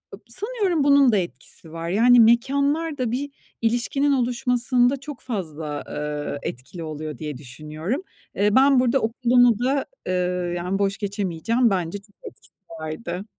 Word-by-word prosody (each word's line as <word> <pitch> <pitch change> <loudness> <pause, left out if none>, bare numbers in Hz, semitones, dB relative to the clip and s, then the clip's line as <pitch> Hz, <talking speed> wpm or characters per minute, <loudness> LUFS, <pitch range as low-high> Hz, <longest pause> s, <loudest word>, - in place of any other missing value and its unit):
Ip 205 - -21
Sanıyorum 390 - -1
bunun 280 -3 +5
da 210 - +3
etkisi 165 -2 -6
var. 165 +1 -5
Yani, 240 +5 +5
mekânlar 280 +7 +3
da 245 -3 -1
bir 280 +3 -2 0.3
ilişkinin 245 +5 +1
oluşmasında 250 0 +2
çok 285 -1 -9
fazla, 155 - -4
ııı, 150 -1 -4
etkili 135 +8 -6
oluyor 155 -1 -6
diye 150 -4 -5
düşünüyorum. 155 - -5 0.3
Iıı, 205 +2 +2
ben 270 0 +6
burada 255 +2 +3
okulumu 240 0 +3
da, 270 +2 +1 0.2
ııı, 180 -1 -1
yani, 180 +3 -2
boş 195 0 0
geçemeyeceğim. 205 +4 0
Bence 180 0 -1
çok 205 0 -25
etkisi - - -13 0.3
vardı. 170 +4 -5
220 Hz, 145 wpm, -23 LUFS, 170-255 Hz, 0.3 s, ben